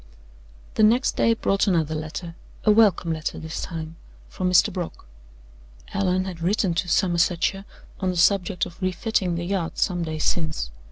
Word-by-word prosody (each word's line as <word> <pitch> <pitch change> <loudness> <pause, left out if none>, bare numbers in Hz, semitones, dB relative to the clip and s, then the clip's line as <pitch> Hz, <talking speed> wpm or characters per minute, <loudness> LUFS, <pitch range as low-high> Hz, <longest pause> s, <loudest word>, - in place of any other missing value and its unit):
The - - 0
next 230 +5 +4
day 230 - +3
brought 195 -2 +1
another 160 -5 +1
letter 155 +2 -5 0.3
a 215 - +6
welcome 200 -6 +4
letter 155 0 -4
this 160 0 -5
time, 165 -1 -6 0.3
from 185 -1 -2
Mr. 180 -1 +4
Brock. 175 - -6 0.9
Allan 185 -1 +1
had 180 -3 -7
written 185 +1 +1
to 175 +2 -1
Somersetshire 180 +2 +1 0.3
on 190 - 0
the 180 - -2
subject 180 0 +2
of 175 - -12
refitting 185 -1 0
the 170 +1 -3
yacht 180 -3 -2
some 180 -3 0
days 155 -2 -3
since. 155 -3 -1
180 Hz, 160 wpm, -24 LUFS, 165-195 Hz, 0.9 s, a